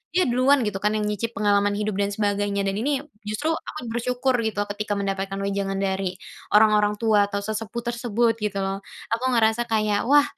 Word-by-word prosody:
dia 365 - +5
duluan 255 +2 +4
gitu 210 -2 -2
kan 210 - +3
yang 215 - 0
nyicip 215 +3 -3
pengalaman 205 0 +2
hidup 210 0 -2
dan 200 - +2
sebagainya, 205 -1 0
dan 195 - 0
ini 270 +4 0 0.3
justru 215 +9 -1
aku 325 - -5
bersyukur 250 +2 0
gitu 210 -2 -3
ketika 205 0 -3
mendapatkan 195 -1 -2
wejangan 200 0 -1
dari 190 -1 -1 0.4
orang-orang 210 -1 +5
tua 215 -3 +4
atau 200 0 -3
sesepuh 220 +2 -4
tersebut 235 -1 +1
gitu 210 -2 -2
loh. 195 0 -2 0.3
Aku 230 +2 0
ngerasa 225 +1 +3
kayak, 215 -2 +1
wah 290 +2 +6
210 Hz, 180 wpm, -24 LUFS, 200-235 Hz, 0.4 s, wah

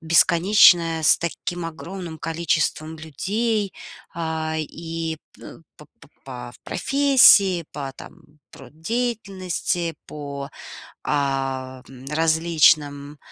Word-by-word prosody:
бесконечное, 165 0 +5
с 155 - +5
таким 170 +1 -4
огромным 165 0 -7
количеством 160 -1 -1
людей, 200 - -2 0.4
а, 160 -1 -3
и 165 +1 -5 0.2
пэ - - -12 0.2
п 150 - -14 0.2
п 145 - -17 0.2
по 125 -2 -8
в - - -20
профессии, 250 - +5
по, 140 -2 -6
там, - - -13 0.3
труд 155 - -15
деятельности, 190 -6 -2
по, 140 -2 -7 0.5
а, 135 -2 -2
в - - -17
м, 130 0 -13
различным, 150 -2 +2
160 Hz, 105 wpm, -22 LUFS, 145-175 Hz, 0.5 s, бесконечное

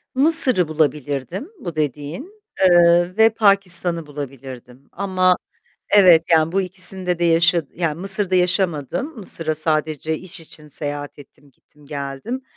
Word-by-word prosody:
Mısır'ı 265 - +5
bulabilirdim 150 - -3
bu 175 - -8
dediğin, 155 - -5 0.3
eee, 175 +1 +3
ve 220 0 +5
Pakistan'ı 185 -6 +1
bulabilirdim 135 -3 -11
ama 185 -1 0 0.6
evet, 180 -5 +6
yani 160 0 +2
bu 195 - +1
ikisinde 185 -1 +1
de 175 - -1
yaşa 165 0 +2
Yani 165 -2 -3
Mısır'da 195 0 +2
yaşamadım. 180 - -1
Mısır'a 165 -5 -3
sadece 155 0 -2
iş 180 0 -11
için 155 -1 -14
seyahat 145 0 -6
ettim, 145 0 -18
gittim 145 +3 -25
geldim. 140 - -6
170 Hz, 125 wpm, -19 LUFS, 150-190 Hz, 0.6 s, evet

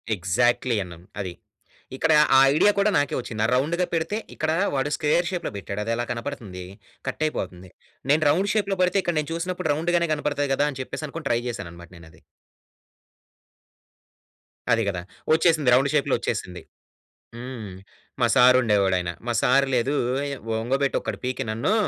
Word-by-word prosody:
Exactly 120 +6 +1
అన్నామ్ 85 -1 -12 0.2
అది. 90 -3 -5 0.6
ఇక్కడ 160 +4 +2 0.2
ఆ - - +8 0.2
ఐడియా 205 +6 +5
కూడా 205 +1 +3
నాకే 145 -1 0
ఒచ్చింది. 110 -3 -2
రౌండ్‌గా 160 +8 +1
పెడితే 165 +5 -1 0.2
ఇక్కడా 155 +1 0 0.2
వాడు 135 +2 0
స్క్వేర్ 160 +3 +1
షేప్‌లో 175 -2 -3
బెట్టాడు 100 +1 -5
అదేలా 115 +2 -1
కనబడుతుంది, 105 -5 -6 0.4
కట్టైపోతుంది. 95 - -3 0.4
నేను 155 +2 +4
రౌండ్ 190 +7 +2
షేప్‌లో 200 -3 0
బెడితే 180 +2 +2
ఇక్కడ 175 - -1
నేను 150 +1 -4
చూసినప్పుడు 170 -1 -3
రౌండ్‌గానే 170 +2 0
కనబడతాయి 145 -1 -1
గదా! 145 +2 +2
అని 135 - -10
చెప్పేసనుకొని 155 +2 -6
ట్రై 115 - +2
జేశాననమాట 85 -7 -7
నేనది. 80 -1 -16 2.5
అది 115 0 +3
గదా! 90 -3 -2 0.3
ఒచ్చేసింది 160 -4 +3
రౌండ్ 135 +3 +4
షేప్‌లో 145 -2 +2
ఒచ్చేసింది. 95 -7 -4 0.8
హ్మ్. 120 -5 -7 0.5
మా 120 - +4
సారు 125 -1 +7
ఉండేవాడాయన, 95 -5 +1 0.2
మా 120 - 0
సారు 135 +2 +4
లేదూ 125 +4 +1 0.7
ఒంగొబెట్టి 135 +4 0
ఒకటి - - -4
పీకి 125 0 -2
నన్ను, 115 - 0
130 Hz, 140 wpm, -24 LUFS, 110-160 Hz, 2.5 s, ఆ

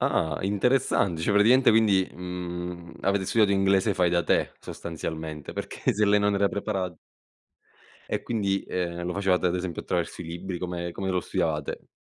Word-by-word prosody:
Ah 75 -2 +1
interessante, 100 -4 +1
cioè 100 - +1
praticamente 115 +6 +6
quindi, 105 -4 +4
mhmm, 90 -1 -6
avete 100 0 +1
studiato 105 0 +3
inglese 95 +1 +3
fai 90 -1 +2
da 85 0 +2
te - - +1
sostanzialmente, 80 -2 -6
perché - - -2
se 105 +1 +2
lei 105 0 +4
non 105 0 +2
era 100 0 +3
preparat 95 -3 -3 1.1
E - - -1
quindi, 100 -4 0
ehm, 85 -1 -2
lo 90 0 -3
facevate 95 -2 +2
ad 90 - +1
esempio 90 -2 -3
attraverso - - -2
i - - -5
libri? 85 +2 -5
Come 85 -1 -4
come 95 - -4
lo 90 -1 +1
studiavate? 75 -4 -2
90 Hz, 165 wpm, -26 LUFS, 85-100 Hz, 1.1 s, praticamente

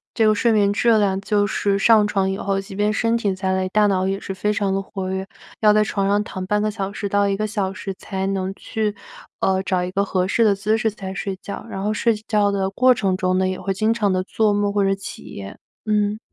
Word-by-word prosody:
这 225 - +3
个 215 - +5
睡 230 +2 +2
眠 205 -2 +3
质 235 +3 +2
量 195 -2 +1
就 205 0 +1
是 200 0 0
上 215 +1 +5
床 195 -2 0
以 - - -2
后， 195 -1 -1
即 195 +1 -8
便 210 +1 +1
身 230 +1 +1
体 210 -4 0
再 190 0 -1
累， 190 0 -1
大 210 +2 +3
脑 190 -2 +1
也 195 0 -1
是 195 - -6
非 210 +2 -1
常 200 -2 0
地 195 - 0
活 190 -1 -5
跃， 190 0 -3 0.3
要 210 -1 +5
在 215 0 +4
床 200 -2 -1
上 205 +1 +3
躺 185 -3 -6
0.5 210 +1 +1
个 215 - 0
小 200 -2 -4
时 200 0 -4
到 205 0 +2
1 195 - 0
个 215 - -1
小 200 -3 -2
时 195 0 -6
才 190 0 -4
能 195 -1 -1
去， 210 0 -3 0.4
呃， 190 0 +1
找 185 -2 0
一 180 - -4
个 200 +1 +1
合 185 -2 0
适 230 +4 +2
的 210 -3 +4
姿 210 +3 0
势 225 0 +1
才 195 -2 -7
睡 195 0 -4
觉。 200 - -7
然 195 - -5
后 210 +1 0
睡 230 +1 +2
觉 210 -2 +2
的 195 -1 -1
过 255 +5 +4
程 195 -4 0
中 185 0 0
呢， 190 0 +2
也 185 0 -3
会 195 - -3
经 215 +4 +1
常 210 -4 +1
地 185 0 0
做 215 +2 +1
梦 205 0 0
或 205 -1 +2
者 195 0 +2
起 195 - -9
夜。 100 -2 -8 0.3
嗯。 210 -1 +1
200 Hz, 275 characters per minute, -21 LUFS, 190-210 Hz, 0.4 s, 个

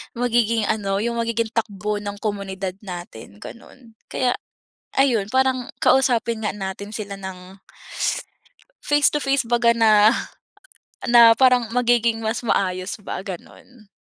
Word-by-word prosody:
magiging 230 -2 +1
ano, 200 -2 -1
yung 235 0 -2
magiging 230 -1 -1
takbo 210 -2 -2
ng 205 0 -6
komunidad 195 -3 -4
natin 175 - -10
ganon, 235 0 -13 0.2
kaya 255 -1 0 0.6
ayun 245 -7 +2
parang 260 -1 +1 0.2
kausapin 235 -4 +2
nga - - -1
natin 200 +1 -6
sila 200 -2 -6
ng 190 0 -10 1.3
face 290 0 +4
to 295 - -2
face 275 -1 +1
baga 235 0 +2
na 220 -1 +5 1.0
na 235 -1 +8
parang 250 -3 +4
magiging 235 -2 +2
mas 220 +1 -1
maayos 185 -3 -1
ba 205 - -6
ganun. 210 +4 -11
225 Hz, 125 wpm, -22 LUFS, 200-240 Hz, 1.3 s, na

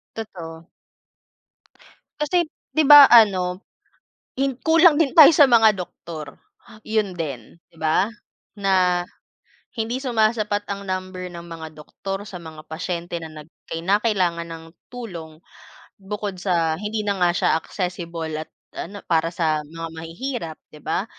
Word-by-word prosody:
Totoo. 170 -6 -8 1.5
Kasi, 325 +4 +2 0.3
'di 315 - +4
ba, 290 -1 +10
ano, 190 -6 +4 0.7
hin 270 -1 -1
kulang 325 -1 +6
din 295 -3 +2
tayo 310 -3 +10
sa 290 - +8
mga 225 -5 +5
doktor, 165 -4 -8 0.5
'yon 215 -3 0
din, 155 -4 -7
'di - - -26
ba? 160 +5 +1 0.5
Na 185 -3 +2 0.7
hindi 230 +2 -2
sumasapat 215 -4 0
ang 200 0 -5
number 185 -1 -5
ng 170 -1 -8
mga 160 -1 -8
doktor 195 +6 -7
sa 195 - -8
mga 160 -3 -10
pasyente 170 +1 -4
na 160 - -10
nag 150 - -15 0.2
kinakailangan 185 -1 0
ng 165 -1 -9 0.3
tulong, 170 -10 -8 0.6
bukod 200 -1 -5
sa 170 -4 +1
hindi 210 0 -3
na 200 -2 -1
nga 175 - +4
siya - - +2
accessible 170 -2 -4
at 160 - -10 0.2
ano, 200 +4 -7
para 165 -1 +1
sa 160 -3 0
mga 165 +2 -8
mahihirap, 165 - -6 0.2
'di 150 - -13
ba? 190 - -2
185 Hz, 135 wpm, -22 LUFS, 165-215 Hz, 1.5 s, ba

